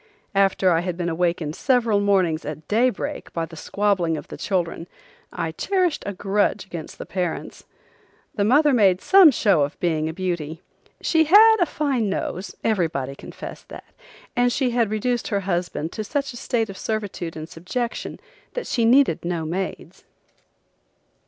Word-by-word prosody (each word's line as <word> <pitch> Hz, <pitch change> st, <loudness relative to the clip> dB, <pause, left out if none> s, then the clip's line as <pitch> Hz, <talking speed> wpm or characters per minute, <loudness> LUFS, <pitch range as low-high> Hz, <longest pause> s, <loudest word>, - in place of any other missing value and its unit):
After 195 Hz, -1 st, +3 dB
I 165 Hz, -, +3 dB
had 175 Hz, 0 st, -3 dB
been 175 Hz, -1 st, -1 dB
awakened 170 Hz, -2 st, -1 dB
several 235 Hz, -6 st, +2 dB
mornings 190 Hz, -6 st, +2 dB
at 155 Hz, +1 st, -7 dB
daybreak 235 Hz, +1 st, 0 dB
by 165 Hz, -1 st, -1 dB
the 165 Hz, -, -13 dB
squabbling 180 Hz, -1 st, 0 dB
of -, -, -9 dB
the -, -, -7 dB
children 175 Hz, -3 st, -2 dB, 0.4 s
I 165 Hz, -1 st, -3 dB
cherished 365 Hz, -, 0 dB
a 205 Hz, -, -2 dB
grudge 200 Hz, +2 st, 0 dB
against 170 Hz, -4 st, -8 dB
the -, -, -7 dB
parents. 180 Hz, -3 st, -4 dB, 0.7 s
The 205 Hz, -, 0 dB
mother 285 Hz, +7 st, +4 dB
made 195 Hz, -6 st, +4 dB
some 385 Hz, -, +7 dB
show 200 Hz, -, +3 dB
of 145 Hz, +1 st, -2 dB
being 160 Hz, -3 st, 0 dB
a -, -, -5 dB
beauty. 170 Hz, -3 st, -4 dB, 0.4 s
She 320 Hz, -1 st, +3 dB
had 440 Hz, +7 st, +7 dB
a 350 Hz, -, +4 dB
fine 270 Hz, -10 st, 0 dB
nose, 190 Hz, -1 st, -4 dB
everybody 160 Hz, -11 st, 0 dB
confessed -, -, -10 dB
that, -, -, -12 dB, 0.4 s
and 245 Hz, 0 st, +3 dB
she 255 Hz, -1 st, 0 dB
had 235 Hz, -3 st, +1 dB
reduced 235 Hz, +3 st, -1 dB
her 200 Hz, -1 st, -1 dB
husband 175 Hz, -3 st, -2 dB
to 215 Hz, -, -4 dB
such 275 Hz, +5 st, -2 dB
a -, -, -8 dB
state 225 Hz, -3 st, -1 dB
of 195 Hz, -, -11 dB
servitude 205 Hz, -7 st, -4 dB
and 155 Hz, 0 st, -6 dB
subjection 180 Hz, +8 st, -4 dB, 0.4 s
that -, -, -3 dB
she 235 Hz, -2 st, 0 dB
needed 250 Hz, -, +4 dB
no 170 Hz, -2 st, -2 dB
maids. 185 Hz, +4 st, -5 dB
195 Hz, 165 wpm, -23 LUFS, 170-240 Hz, 0.7 s, some